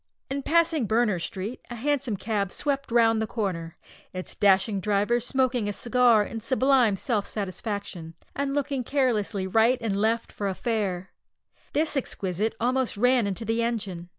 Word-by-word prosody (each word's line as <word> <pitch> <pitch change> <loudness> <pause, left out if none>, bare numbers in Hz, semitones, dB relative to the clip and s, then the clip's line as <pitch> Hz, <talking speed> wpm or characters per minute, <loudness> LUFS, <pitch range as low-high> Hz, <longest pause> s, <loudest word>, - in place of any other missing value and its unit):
In 280 +1 -1
passing 325 -4 +2
Berners 220 -6 +1
Street, 205 +6 -5
a 240 - -6
hansom 265 -3 -1
cab 200 -3 -1
swept 280 -1 -2
round 225 -1 +4
the 220 - -1
corner, 185 -6 -3 0.4
its 185 0 -5
dashing 200 +1 +3
driver 210 +4 +1
smoking 250 -3 0
a - - -2
cigar 240 0 +3
in 225 +2 -6
sublime 255 -2 +3
self 210 -1 -1
satisfaction, 195 -4 -5 0.2
and 280 0 -1
looking 280 -2 -1
carelessly 225 -7 0
right 225 +6 +3
and 225 -4 -1
left 230 +1 0
for 200 - -3
a 190 - -2
"fare." 195 -6 -2 0.6
This 310 +1 +1
exquisite 205 -5 -2
almost 250 -1 0
ran 245 0 +3
into 200 +3 -4
the 225 +1 0
engine! 200 -7 -2
225 Hz, 155 wpm, -26 LUFS, 200-255 Hz, 0.6 s, round